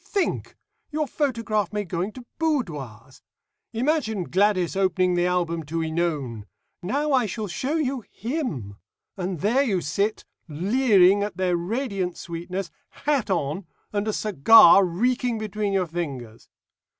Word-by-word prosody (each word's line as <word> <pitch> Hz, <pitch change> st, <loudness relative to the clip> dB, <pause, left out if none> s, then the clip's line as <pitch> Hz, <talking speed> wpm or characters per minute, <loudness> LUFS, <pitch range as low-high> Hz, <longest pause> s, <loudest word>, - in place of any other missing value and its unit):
Think! 395 Hz, -3 st, -2 dB, 0.3 s
your 305 Hz, 0 st, -1 dB
photograph 230 Hz, -, -1 dB
may 210 Hz, -1 st, -2 dB
go 170 Hz, -1 st, -3 dB
into 215 Hz, +6 st, -5 dB
boudoirs. 150 Hz, -, -3 dB, 0.5 s
Imagine 235 Hz, -, 0 dB
Gladys 185 Hz, 0 st, +1 dB
opening 185 Hz, -1 st, +2 dB
the 175 Hz, 0 st, +2 dB
album 170 Hz, -2 st, 0 dB
to 165 Hz, +3 st, -3 dB
Ænone; 155 Hz, -9 st, -2 dB, 0.4 s
'Now 285 Hz, +11 st, -1 dB
I 255 Hz, -5 st, +3 dB
will 215 Hz, -1 st, -3 dB
show 260 Hz, -, -2 dB
you 270 Hz, -6 st, -1 dB
him.' 200 Hz, -, -4 dB, 0.4 s
And 180 Hz, -3 st, -4 dB
there 230 Hz, +8 st, +3 dB
you 215 Hz, -9 st, +1 dB
sit, 200 Hz, +7 st, -1 dB, 0.2 s
leering 195 Hz, -, +4 dB
at 200 Hz, -3 st, -3 dB
their 185 Hz, -1 st, +1 dB
radiant 195 Hz, -1 st, -2 dB
sweetness, 175 Hz, +2 st, -5 dB, 0.3 s
hat 290 Hz, -8 st, +1 dB
on, 170 Hz, 0 st, -1 dB, 0.3 s
and 205 Hz, +1 st, -1 dB
a 215 Hz, -, 0 dB
cigar 205 Hz, 0 st, +7 dB
reeking 240 Hz, +6 st, 0 dB
between 215 Hz, -1 st, -2 dB
your 190 Hz, -2 st, +2 dB
fingers. 140 Hz, -10 st, -6 dB
195 Hz, 135 wpm, -24 LUFS, 170-235 Hz, 0.5 s, cigar